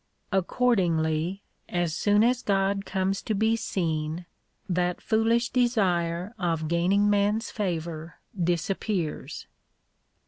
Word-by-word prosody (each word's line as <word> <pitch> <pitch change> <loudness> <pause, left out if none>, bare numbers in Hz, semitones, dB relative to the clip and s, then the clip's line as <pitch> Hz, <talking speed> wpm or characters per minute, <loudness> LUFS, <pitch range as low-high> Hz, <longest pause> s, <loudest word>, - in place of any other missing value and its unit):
Accordingly, 180 -4 +1 0.3
as 175 -2 0
soon 205 +4 +3
as 245 +1 +2
God 195 0 0
comes 190 0 -1
to 220 - -2
be 220 +2 +2
seen, 165 -6 -2 0.4
that 180 -1 0
foolish 230 +2 +2
desire 185 -6 +1
of 165 -3 -1
gaining 180 +5 +2
man's 205 +2 +1
favour 165 -5 -3 0.2
disappears. 175 0 -2
190 Hz, 100 wpm, -27 LUFS, 170-210 Hz, 0.4 s, soon